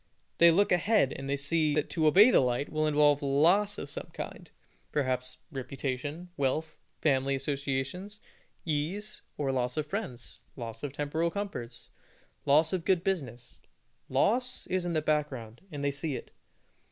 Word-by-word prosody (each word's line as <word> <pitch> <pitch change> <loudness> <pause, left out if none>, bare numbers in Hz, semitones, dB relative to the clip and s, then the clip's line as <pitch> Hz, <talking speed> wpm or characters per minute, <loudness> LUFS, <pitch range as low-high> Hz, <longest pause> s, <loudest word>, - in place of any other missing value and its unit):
They 170 - +8
look 195 +5 +3
ahead, 180 - +3
and 135 0 -6
they 140 - +1
see 150 +1 +1
that 150 - +1
to 160 -2 +2
obey 205 +10 +7
the - - +6
light 125 +2 0
will 155 0 0
involve 145 -1 +4
loss 170 +9 +3
of - - -5
some - - -7
kind - - -7 0.4
perhaps 130 -3 -1
reputation, 140 +4 -4
wealth, 140 +3 -1 0.3
family 135 -2 +2
associations, 140 +8 -3 0.5
ease, 180 +8 -2 0.2
or 140 -2 0
loss 125 0 -1
of 155 - 0
friends, 155 - -5
loss 115 -3 -6
of 145 - -4
temporal 150 +4 -1
comforts, 165 - -6 0.6
loss 155 +4 +4
of 180 -3 -1
good 180 -1 +2
business. 125 -11 -3 0.5
Loss 245 - +1
is 185 -1 -1
in 170 - -1
the 155 -2 0
background, 135 -7 -2
and 145 -2 -5
they 140 - +2
see 145 0 -3
it. - - -8
150 Hz, 155 wpm, -30 LUFS, 135-170 Hz, 0.6 s, They